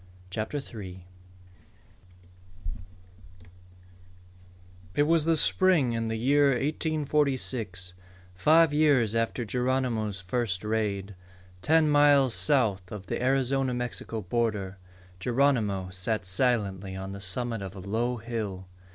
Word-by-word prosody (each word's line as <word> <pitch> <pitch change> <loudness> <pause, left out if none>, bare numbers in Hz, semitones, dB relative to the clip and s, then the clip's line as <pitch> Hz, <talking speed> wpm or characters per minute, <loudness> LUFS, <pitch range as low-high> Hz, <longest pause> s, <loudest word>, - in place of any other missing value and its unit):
CHAPTER 110 +8 -3
THREE 95 -9 -9 2.4
Alope - - -21 1.5
It 145 - +4
was 165 0 +3
spring 165 -11 +3
in 115 0 -2
the 110 - -2
year 140 +5 +3
1846, 135 - -1 0.4
five 155 - +4
years 140 -8 +3
after 115 +1 -1
Geronimo's 125 -4 -1
first 95 0 -2
raid. 105 -2 -2 0.5
Ten 160 - +3
miles 145 -3 +5
south 105 - +1
of 105 -2 -7
the - - -3
Arizona 135 0 +1
Mexico 120 -2 -4
border, 100 -2 -2 0.4
Geronimo 110 -6 +1
sat 95 +2 -2
silently 100 -2 0
on 95 0 -6
the 100 0 -8
summit 115 +4 -3
of 95 0 -7
a - - -8
low 115 +6 -2
hill. 110 -5 -5
115 Hz, 110 wpm, -27 LUFS, 100-135 Hz, 2.4 s, miles